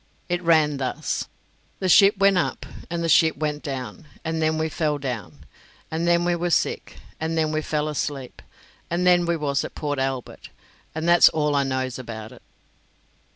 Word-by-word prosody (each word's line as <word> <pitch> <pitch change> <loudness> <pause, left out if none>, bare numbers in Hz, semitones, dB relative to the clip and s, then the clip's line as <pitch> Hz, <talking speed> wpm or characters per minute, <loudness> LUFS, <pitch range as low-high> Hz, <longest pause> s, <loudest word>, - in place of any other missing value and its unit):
It 175 0 0
ran 155 -4 +3
thus: 130 -1 -3 0.5
"The 190 - -2
ship 195 +3 +6
went 195 0 +4
up, 180 - -1 0.2
and 170 -1 -3
the - - 0
ship 160 -1 +4
went 150 0 -2
down; 140 +2 -6 0.2
and 160 0 -2
then 155 0 +1
we 160 0 0
fell 155 -1 -1
down, 120 - -6 0.5
and 165 +2 -1
then 170 0 +3
we 175 0 +2
was 175 0 +1
sick; - - -2 0.2
and 160 +1 -2
then 155 -1 +1
we 155 0 -1
fell 150 0 -2
asleep; 145 -3 -4 0.5
and 175 +2 0
then 175 -1 +4
we 170 -1 +1
was 140 -2 -1
at - - -8
Port 145 -2 -3
Albert; 135 -2 -4 0.5
and 160 +1 -2
that's 175 0 +7
all 150 -2 0
I 140 - +3
knows 130 -1 -2
about 110 -3 -8
it." - - -15
155 Hz, 185 wpm, -24 LUFS, 140-170 Hz, 0.5 s, that's